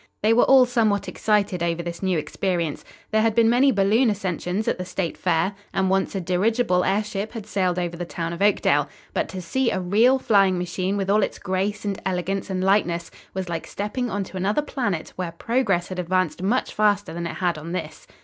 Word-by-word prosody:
They 220 +1 +5
were 240 - +5
all 265 -1 +7
somewhat 225 -5 +1
excited 205 -4 0
over 170 0 -1
this 170 0 -6
new 190 -3 +1
experience. 165 +1 -2 0.3
There 220 0 +3
had 225 -1 +2
been 230 -1 +5
many 265 +3 +4
balloon 215 +4 +3
ascensions 190 0 -2
at - - 0
the - - -2
State 180 -1 -3
Fair, 175 +2 0 0.2
and 190 -1 +1
once 195 +1 0
a - - 0
dirigible 185 +2 +1
airship 205 +2 -1
had 225 -4 -6
sailed 185 -3 0
over 175 -1 -2
the 175 - -4
town 170 -1 -4
of 170 - -7
Oakdale. 145 -8 +3 0.2
But - - -1
to 185 -2 -6
see 265 +5 0
a - - -1
real 215 +9 +4
flying 195 -7 +3
machine 180 +2 -2
with 195 0 0
all 210 +1 +4
its - - -1
grace 195 +3 -2
and 200 -2 -3
elegance 190 +1 -2
and 185 -1 -1
lightness 180 -3 +1 0.2
was 190 -1 -3
like 170 -1 -4
stepping 235 +5 -3
onto 195 -2 -4
another 205 +10 +1
planet 205 - -3
where 180 -2 -3
progress 195 -3 0
had 185 -1 -5
advanced 180 -2 0
much 220 +7 0
faster 205 -3 +1
than 170 0 -3
it - - -6
had 175 -4 -1
on 165 +3 -7
this. 160 -4 -6
190 Hz, 205 wpm, -23 LUFS, 175-210 Hz, 0.3 s, all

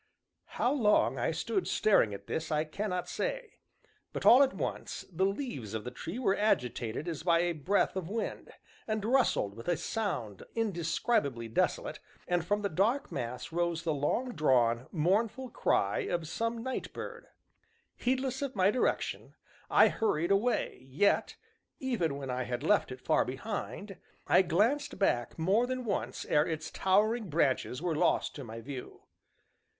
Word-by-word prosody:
How 250 - +2
long 215 -7 +3
I - - +1
stood 385 - -1
staring 200 - +3
at 100 0 -8
this, 160 +8 -3
I 155 0 +2
cannot 180 +3 -3
say, - - -4 0.5
but, - - -4
all 250 +3 +9
at 270 -1 +5
once, - - -4
the 185 +3 +2
leaves 175 - -4
of 110 - -3
the 125 - -5
tree 165 - -6
were 225 -6 +2
agitated 125 - 0
as 165 -3 -3
by 170 0 +3
a 175 0 +1
breath 175 +7 +1
of 185 -3 -3
wind, 225 +2 -4 0.4
and 215 -2 -1
rustled 240 - +2
with 115 - -10
a 175 -2 +2
sound 125 - -3
indescribably 165 - 0
desolate, 110 - 0 0.3
and 175 -2 +1
from 205 +4 0
the - - +2
dark 205 - +1
mass 125 +3 -4
rose 170 -1 -1
the 165 -2 0
long 190 - 0
drawn, 125 - +2
mournful 215 +9 0
cry 100 +1 +1
of 170 -2 -2
some 230 +6 -2
night 260 0 -4
bird. 485 +1 -7 0.7
Heedless 260 +1 -1
of 275 -3 -3
my 190 +1 +4
direction, 250 - -1 0.3
I - - +6
hurried 170 -5 0
away, 200 - +1
yet, 165 +10 +2 0.4
even 180 - -1
when 135 -2 -4
I 125 0 -2
had 125 +2 -3
left 200 -3 +2
it 130 0 -8
far - - +3
behind, 195 - -5 0.3
I 180 - +5
glanced 240 - +1
back 120 - 0
more 195 +9 +2
than 255 -1 -3
once 125 - -2
ere 150 +1 +3
its 155 -1 -4
towering 210 +3 +2
branches 145 -2 0
were 170 -3 0
lost - - +2
to 140 - -6
my 115 -1 -8
view. 130 +1 -8
180 Hz, 160 wpm, -31 LUFS, 140-225 Hz, 0.7 s, all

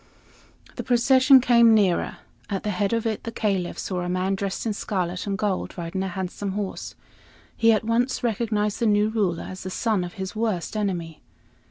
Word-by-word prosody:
The - - -3
procession 260 +2 +5
came 235 -2 +6
nearer. 195 -5 +1 0.3
At 195 -2 -3
the 210 - -1
head 200 +1 0
of 230 -1 0
it 220 -2 -2
the 230 - -5
Caliph 195 -6 -1
saw 180 -2 -3
a 175 - -3
man 185 +2 0
dressed 195 +1 -3
in 220 - 0
scarlet 180 -3 -3
and 200 -1 -1
gold, 195 -2 -2
riding 175 +2 -3
a 190 - -1
handsome 190 +1 -4
horse. 200 -1 -5 0.6
He 230 0 +4
at 215 -1 +2
once 240 +4 0
recognized 215 -2 0
the 235 - +2
new 210 0 +3
ruler 200 -7 -1
as 185 0 -8
the 185 - -5
son 210 -1 0
of 175 - -6
his 190 +2 -6
worst 215 -4 -2
enemy. 175 -7 -3
205 Hz, 190 wpm, -24 LUFS, 185-225 Hz, 0.6 s, came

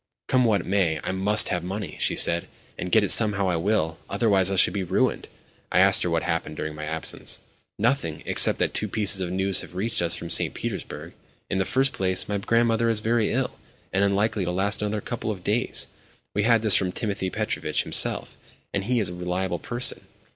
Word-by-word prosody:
"Come 125 -1 +3
what 105 -3 +1
may, 90 -5 +1
I - - -2
must 100 +3 +2
have 90 - -2
money," 95 +2 -5
she - - +2
said. 85 0 +1 0.3
"And 90 - -6
get 110 - +5
it 100 - +2
somehow 100 -3 +3
I 90 - +1
will—otherwise 95 +2 +1
I 100 - -1
shall 95 - +4
be 100 - -2
ruined." 90 - 0 0.4
I - - +1
asked - - +5
her - - 0
what - - 0
had - - -1
happened 75 - -3
during 80 0 -4
my 75 0 -7
absence. 80 +1 -4 0.4
"Nothing; 115 - -1
except - - +5
that - - -1
two 105 - -1
pieces 100 -3 +2
of 90 - -2
news 95 +1 +1
have - - -12
reached 110 +3 -1
us 85 0 +1
from 85 - -5
St. - - +3
Petersburg. - - -6 0.4
In 95 - 0
the 95 - +1
first 135 +5 +1
place, 95 -1 0
my 105 -1 -2
grandmother 115 +2 +1
is 115 -2 +1
very 110 0 0
ill, - - -2 0.3
and 95 - +2
unlikely 100 +1 +1
to 90 - -2
last 95 +4 0
another 105 0 -2
couple 120 0 -5
of 95 -5 -5
days. 110 +5 0 0.5
We 105 - 0
had 115 +1 +3
this 110 - +5
from 95 -2 +1
Timothy 100 -2 -3
Petrovitch - - -2
himself, - - +1 0.4
and 100 0 -2
he 125 +1 +1
is 100 -5 0
a - - -7
reliable 90 0 -3
person. 120 +6 -1
100 Hz, 210 wpm, -24 LUFS, 90-110 Hz, 0.5 s, get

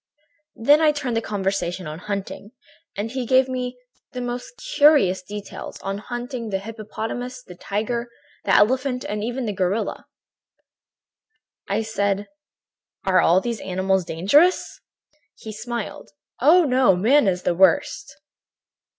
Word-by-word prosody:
"Then 290 +7 +4
I 310 -1 +5
turned 280 -5 -3
the 225 - +1
conversation 195 -4 -2
on 155 +1 -6
hunting, 200 +2 -5 0.4
and 215 +3 -3
he 260 0 -2
gave 260 +2 +4
me 250 -1 -4 0.4
the 250 - -4
most 245 - -5
curious 295 - +4
details 205 +2 -8
on 195 +1 -3
hunting 240 +1 -5
the 195 - 0
hippopotamus, 225 +4 -6
the 180 - -12
tiger, 220 +6 -3 0.3
the - - +3
elephant 255 +3 +2
and 210 0 -3
even 245 +2 -3
the 210 - -2
gorilla. 190 +3 -2 1.6
"I 205 +3 0
said: 200 -2 -1 0.8
"'Are 185 -1 +4
all 180 +3 +4
these 235 -1 -3
animals 190 0 0
dangerous?' 205 - +2 0.5
"He 220 - -9
smiled: 235 +1 -6 0.3
"'Oh, 325 +8 +6
no! 255 - +4
Man 235 +7 +4
is 180 -1 0
the - - +1
worst.' 190 +2 +2
220 Hz, 135 wpm, -23 LUFS, 195-250 Hz, 1.6 s, Oh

